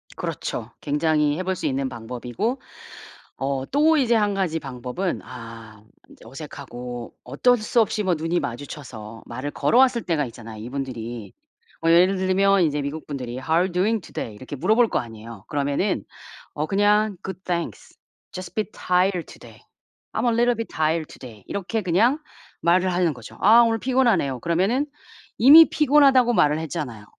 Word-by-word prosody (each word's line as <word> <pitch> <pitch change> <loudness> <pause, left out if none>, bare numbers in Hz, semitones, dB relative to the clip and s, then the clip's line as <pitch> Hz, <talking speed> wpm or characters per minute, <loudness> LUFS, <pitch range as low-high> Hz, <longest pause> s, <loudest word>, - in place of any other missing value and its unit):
그렇죠. - - -5
굉장히 150 0 +1
해 185 - -3
볼 190 0 -1
수 - - -6
있는 135 0 -1
방법이고. 125 - -4 0.8
어 135 -1 -2
또 310 +3 +4
이제 240 -5 +3
1 210 -2 +2
가지 175 -4 -1
방법은 135 +6 -4
아 115 -3 -11 0.3
인제 - - -17
어색하고 120 0 -8
어떨 245 - +2
수 230 +2 +2
없이 210 0 0
뭐 185 - +2
눈이 165 +2 -1
마주쳐서 120 -4 -7
말을 130 +5 -5
걸어왔을 245 - +3
때가 160 -4 0
있잖아요, 115 -2 -10
이분들이. 120 -5 -6 0.5
뭐 165 - +3
예를 180 +3 +5
들면 190 +1 +3
이제 150 -2 0
미국분들이 140 -4 -5
"How 130 - -11
are 165 - +4
you 190 - -2
doing 205 +6 +1
today?" 115 -9 -7
이렇게 130 +6 -8
물어볼 220 - +3
거 - - 0
아니에요. 115 -2 -10
그러면은 145 - -1 0.5
어 150 - -2
그냥 205 +1 +2
"Good, 190 -1 -6
thanks. 170 -2 -4 0.3
Just 185 -1 -8
bit 215 0 -2
tired 180 -1 0
today. - - -14 0.5
I'm - - -1
a 240 - +3
little 240 +1 +2
bit 230 0 -4
tired 160 0 0
today." 110 -6 -12
이렇게 200 +3 -3
그냥 215 - +2 0.4
말을 180 +2 +2
하는 175 -3 +1
거죠. 125 -5 -12
"아, 225 +4 +7
오늘 225 -1 +2
피곤하네요." 235 - +1
그러면은 190 - +1 0.5
이미 300 +7 +9
피곤하다고 275 -4 +4
말을 150 -6 +3
했잖아요. 145 -10 -5
170 Hz, 425 characters per minute, -23 LUFS, 130-210 Hz, 0.8 s, 이미